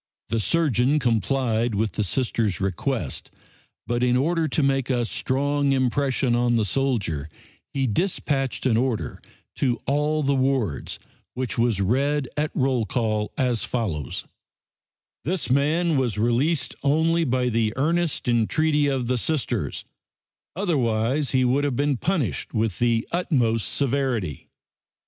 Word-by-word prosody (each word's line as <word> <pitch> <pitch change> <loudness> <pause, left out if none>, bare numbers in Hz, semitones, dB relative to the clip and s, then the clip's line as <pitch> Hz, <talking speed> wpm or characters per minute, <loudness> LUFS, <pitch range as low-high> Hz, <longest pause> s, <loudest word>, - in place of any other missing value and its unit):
The 115 - 0
surgeon 140 0 +2
complied 120 -2 +1
with 110 +1 0
the 105 - -1
Sister's 110 -3 0
request, 95 - -2 0.6
but 120 0 -1
in 125 0 +3
order 160 +4 +1
to 150 +1 0
make 135 -1 +1
a 120 -2 +1
strong 140 +4 0
impression 130 -1 +1
on 120 0 +2
the 110 -2 +2
soldier 100 - -1 0.5
he 135 -1 +1
dispatched 135 - -1
an 115 -4 +3
order 125 -2 -1 0.4
to 125 -4 +1
all 150 +2 +1
the 140 0 +2
wards, 130 - 0 0.4
which 125 -1 -3
was 115 -4 +2
read 135 +7 +1
at 150 +1 0
roll 130 -3 +1
call, 110 -4 -1
as 125 -4 +1
follows: 85 - -3 1.0
"This 170 -4 -2
man 155 +4 +2
was 120 -6 0
released 125 +8 +1
only 160 +4 +2
by 125 -3 +1
the 115 -2 +1
earnest 165 +2 0
entreaty 145 +6 +2
of 135 -3 0
the 125 +1 0
Sisters; 155 0 -2 0.7
otherwise 135 - +1
he 130 -1 +2
would 135 +3 +2
have 140 -3 0
been 145 +2 +1
punished 135 - -1
with 110 -4 0
the 115 -1 +1
utmost 125 - +1
severity." 130 - -1
130 Hz, 135 wpm, -24 LUFS, 115-145 Hz, 1.0 s, in